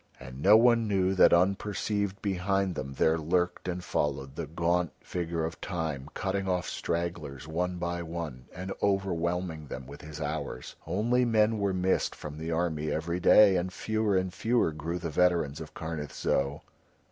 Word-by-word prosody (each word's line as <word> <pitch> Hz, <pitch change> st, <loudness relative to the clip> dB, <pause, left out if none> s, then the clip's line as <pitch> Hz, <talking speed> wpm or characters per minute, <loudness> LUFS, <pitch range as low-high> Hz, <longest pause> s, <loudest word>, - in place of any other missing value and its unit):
And 65 Hz, +1 st, -9 dB
no 105 Hz, +6 st, +8 dB
one 115 Hz, -1 st, +4 dB
knew 95 Hz, -2 st, +2 dB
that 95 Hz, -, +6 dB
unperceived 100 Hz, +2 st, +1 dB
behind 95 Hz, -1 st, 0 dB
them 70 Hz, -4 st, -5 dB
there 80 Hz, +4 st, +3 dB
lurked 90 Hz, +3 st, 0 dB
and 90 Hz, 0 st, -3 dB
followed 70 Hz, -4 st, -2 dB
the 80 Hz, -1 st, -4 dB
gaunt 85 Hz, +1 st, 0 dB
figure 85 Hz, -2 st, -3 dB
of 80 Hz, -, -6 dB
Time 80 Hz, -6 st, -3 dB
cutting 100 Hz, 0 st, -1 dB
off 90 Hz, -1 st, 0 dB
stragglers 85 Hz, -5 st, -3 dB
one 90 Hz, +3 st, -2 dB
by 85 Hz, 0 st, -2 dB
one 80 Hz, -7 st, -6 dB
and 95 Hz, +2 st, -5 dB
overwhelming 90 Hz, -4 st, -1 dB
them 65 Hz, -1 st, -7 dB
with 70 Hz, +2 st, -11 dB
his 75 Hz, -1 st, -9 dB
hours, 75 Hz, -4 st, -4 dB
only 115 Hz, +8 st, +2 dB
men 110 Hz, -2 st, +3 dB
were 100 Hz, -1 st, +1 dB
missed 95 Hz, 0 st, +1 dB
from 75 Hz, 0 st, -8 dB
the 80 Hz, +1 st, -4 dB
army 80 Hz, -2 st, -1 dB
every 85 Hz, +3 st, -1 dB
day, 100 Hz, +1 st, +7 dB
and 90 Hz, +1 st, -2 dB
fewer 110 Hz, -1 st, 0 dB
and 95 Hz, -1 st, -1 dB
fewer 115 Hz, -7 st, +1 dB
grew 80 Hz, +3 st, -4 dB
the 85 Hz, -2 st, -4 dB
veterans 85 Hz, -3 st, +2 dB
of 80 Hz, -, -9 dB
Karnith 80 Hz, -2 st, -5 dB
Zo. 70 Hz, +2 st, 0 dB
85 Hz, 170 wpm, -29 LUFS, 80-95 Hz, -, no